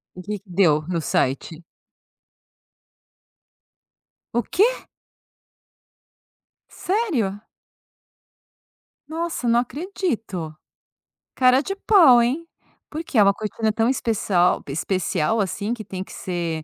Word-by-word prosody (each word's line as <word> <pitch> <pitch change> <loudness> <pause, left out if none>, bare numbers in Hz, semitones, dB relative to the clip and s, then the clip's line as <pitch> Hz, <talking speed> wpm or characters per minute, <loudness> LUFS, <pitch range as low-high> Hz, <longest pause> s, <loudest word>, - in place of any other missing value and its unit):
O 180 - -8
que 205 +3 -5
que 200 0 -28
deu, 170 -5 +3
no 175 -2 -1
site? 150 +3 -1 2.7
O 240 - +1
quê? 465 +7 +1 1.8
Sério? 295 - -1 1.7
Nossa, 325 -5 -3
não 235 +1 +4
acredito. 245 - -4 0.8
Cara 255 +1 +4
de 390 - -4
pau, 335 - +6
hein. 275 +8 -1 0.4
Por 315 +2 -5
quê, 295 - -4
é 210 - +7
uma 200 0 +4
cortina 215 +1 -2
tão 225 +2 +1
especial, 205 -8 +1
pe - - -8
especial 185 +4 -1
assim 200 +3 -2
que 230 -3 -6
tem 190 -2 -6
que - - -14
ser 170 -3 -3
220 Hz, 110 wpm, -22 LUFS, 180-275 Hz, 2.7 s, é